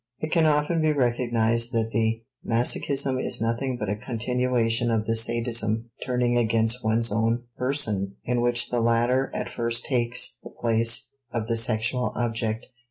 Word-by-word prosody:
It 155 - -5
can 165 -3 +4
often 150 +2 +1
be 155 -1 +2
recognized 120 -2 +1
that 115 -1 0
the 115 +1 0 0.2
masochism 130 +3 +1
is - - -2
nothing 120 +3 -1
but 105 - -4
a 100 - -1
continuation 120 0 0
of 110 -2 0
the 115 - 0
sadism 115 -1 0
turning 125 -1 +1
against 115 +1 +1
one's 115 +1 +1
own 115 +2 0
person 110 -8 -1
in 120 0 0
which 120 0 +2
the 120 -1 +1
latter 120 +3 +2
at - - -3
first 115 0 0
takes 120 -2 0
the - - -9
place 115 0 +2 0.2
of 115 -2 -2
the 115 0 -1
sexual 115 +2 +1
object. 115 0 -2
115 Hz, 160 wpm, -25 LUFS, 115-125 Hz, 0.2 s, can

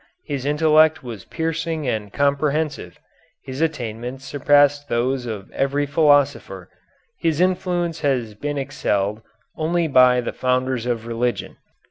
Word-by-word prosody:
His 140 -1 -4
intellect 155 +1 +4
was 115 -6 -8
piercing 160 -2 -3
and 105 -4 -2
comprehensive; 140 - -1 0.5
his 130 +3 -6
attainments 125 -4 -3
surpassed 145 0 +3
those 125 +1 0
of 105 -4 -6
every 140 +1 0
philosopher; 145 -1 +1 0.5
his 160 -2 0
influence 180 -2 0
has 125 -7 0
been 145 +7 -4
excelled 110 -7 -1 0.4
only 165 +1 0
by 125 -3 +5
the 120 - -3
founders 125 -1 -1
of 115 -2 -2
religion 120 +1 -2
140 Hz, 120 wpm, -21 LUFS, 125-155 Hz, 0.5 s, by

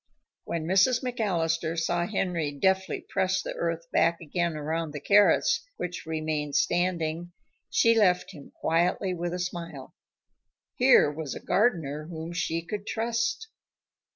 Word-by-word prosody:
When 165 -2 -3
Mrs. 195 +9 +3
McAllister 170 -9 -1
saw 175 +1 0
Henry 180 -7 -1
deftly 190 +6 0
press 190 0 0
the - - -4
earth 165 0 -3
back 170 +1 +2
again 170 0 -2
around 155 +1 -3
the 150 - -4
carrots 205 +7 +4
which 180 -2 -5
remained 155 -2 -2
standing, 175 +1 0 0.4
she 230 - +4
left 185 -5 +3
him 145 -3 -12
quietly 175 +3 0
with 175 0 -3
a - - -3
smile. 175 -1 -6 0.8
Here 250 - +5
was 150 -2 -5
a - - -6
gardener 160 - 0
whom 165 0 -6
she 165 -1 -2
could 205 +4 -6
trust. 230 - -1
170 Hz, 135 wpm, -27 LUFS, 160-190 Hz, 0.8 s, Here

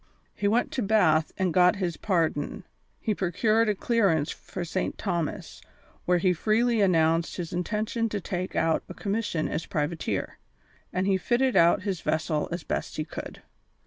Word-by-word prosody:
He 205 - -1
went 230 +4 +1
to 255 - -2
Bath 180 -8 +3
and 185 -3 0
got 180 +2 +5
his 180 -4 -2
pardon; 170 -1 -1 0.4
he 215 - 0
procured 215 +5 +1
a 210 - +1
clearance 190 -9 +1
for 180 -2 -6
St. 185 +3 -2
Thomas, 170 -6 -3 0.4
where 180 0 +3
he 180 +1 +2
freely 225 +5 +2
announced 165 -3 +2
his 175 -3 -5
intention 215 +5 -1
to 205 - -2
take 185 0 -4
out 165 -1 +2
a - - -8
commission 200 -6 -1
as 165 - -3
privateer, 160 -2 -2 0.5
and 185 +1 -1
he 195 -1 +3
fitted 245 +6 +1
out 170 +2 +5
his 190 -4 -2
vessel 155 -1 -1
as 175 - -4
best - - -3
he 155 - -2
could. - - -8
185 Hz, 165 wpm, -27 LUFS, 165-210 Hz, 0.5 s, got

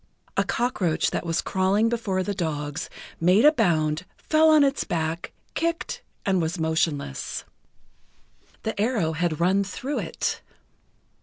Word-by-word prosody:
A - - +3
cockroach 205 -9 0
that - - -3
was 165 - 0
crawling 195 +3 +2
before 215 -5 0
the 205 - -2
dogs, 150 -5 -3 0.3
made 180 - +5
a 300 - +9
bound, 165 - +1
fell 315 0 +4
on 310 -2 +7
its 275 0 +1
back, 165 0 -2 0.2
kicked, 335 +2 -2 0.2
and 190 -2 +2
was 165 +3 -1
motionless. 160 - -1 1.2
The 220 -2 -2
arrow 215 -8 +1
had 160 -1 -1
run 190 +3 +3
through 255 +9 -3
it. - - -2
185 Hz, 135 wpm, -25 LUFS, 160-230 Hz, 1.2 s, a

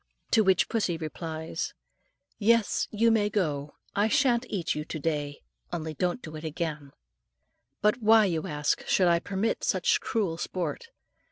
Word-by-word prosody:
To 220 - +5
which 190 -2 +3
pussy 200 -7 0
replies, 160 0 -5 0.6
"Yes; 230 0 +3
you 230 +2 +3
may 210 -2 +2
go. 150 -8 -1 0.2
I 205 +2 +3
shan't 240 +2 +2
eat 185 -5 -1
you 150 - -3
to 155 - -6
day; 145 -2 -2 0.3
only 160 -2 -3
don't 180 - -1
do 155 -2 -8
it 155 - -8
again." 155 -3 -4 0.9
But 210 +3 +3
why, 220 0 +6
you 165 -5 -1
ask, 150 -1 0
should 185 - +3
I 170 -1 +4
permit 200 +5 -2
such 460 -3 +2
cruel 185 -7 -1
sport? 185 - -3
180 Hz, 155 wpm, -28 LUFS, 155-220 Hz, 0.9 s, why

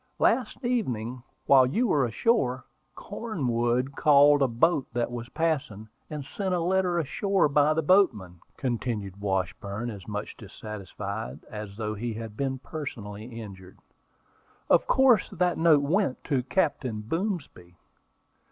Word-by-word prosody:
Last 245 0 +1
evening, 125 - -1 0.2
while 130 -2 +6
you 225 - +1
were 145 - +2
ashore, 130 - +1 0.3
Cornwood 130 - -2
called 145 0 +6
a 135 - +4
boat 130 +4 +2
that 120 0 -1
was 120 0 -6
passing, 135 -11 -2 0.2
and 150 -3 -5
sent 190 +5 -2
a - - 0
letter 180 0 +1
ashore 190 +4 +1
by 150 +1 +3
the 160 - 0
boatman," 125 - +2 0.2
continued 115 -6 -3
Washburn, 100 +3 -2
as 100 -4 -10
much 105 -1 -5
dissatisfied 105 0 -7
as 105 -2 -7
though 110 -1 -2
he 115 +1 -4
had 110 -1 -7
been 135 +1 -2
personally 110 -8 -7
injured. 105 -5 -10 0.9
"Of - - +5
course 260 -6 +4
that 180 -2 0
note 160 -3 +5
went 165 -1 0
to 140 -4 0
Captain 130 - -1
Boomsby." 140 - -4
130 Hz, 135 wpm, -27 LUFS, 110-165 Hz, 0.9 s, while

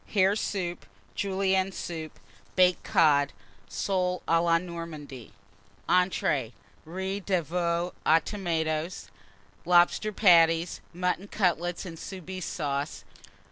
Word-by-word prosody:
Hare 195 0 +4
Soup. 180 -5 -3 0.3
Julienne 190 -1 0
Soup. 160 -4 -6 0.4
Baked 180 -1 +4
Cod. 145 -6 +3 0.4
Soles 180 -2 -1
à 165 0 +3
la 165 -1 +4
Normandie. 165 - -8 0.6
ENTREES. 165 -9 +1 0.3
Riz 190 +4 -4
de 185 -3 +1
Veau 170 +2 -1
aux 160 +1 +5
Tomates. 165 -4 -2 0.5
Lobster 175 +5 +3
Patties. 170 -4 +4
Mutton 180 +2 -2
Cutlets 175 -3 0
and 165 -3 -8
Soubise 185 -1 -7
Sauce. 145 -1 -3
175 Hz, 100 wpm, -28 LUFS, 165-185 Hz, 0.6 s, aux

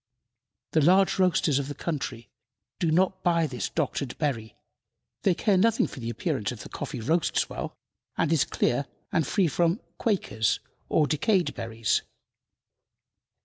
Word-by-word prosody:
The 160 - +3
large 190 +5 +4
roasters 170 -6 +3
of 140 - -3
the 145 - -5
country 130 -8 -4 0.5
do 170 - +1
not 185 +3 +2
buy 170 -3 +3
this 125 -8 -3
doctored 140 -4 -2
berry; 115 -8 -2 0.7
they 190 -3 +3
care 200 +1 +2
nothing 225 +4 +3
for - - -8
the 115 -1 -4
appearance 115 - -2
if - - -8
the - - -10
coffee - - -5
roasts 155 +9 +1
well, - - -5 0.4
and 165 0 +2
is 150 -3 +4
clear 130 +3 0 0.2
and 160 -5 +1
free 195 -3 +2
from 170 - +1 0.2
"quakers" 180 - +1 0.3
or 155 - +4
decayed 175 +5 +1
berries. 115 -2 0
160 Hz, 145 wpm, -27 LUFS, 130-180 Hz, 0.7 s, large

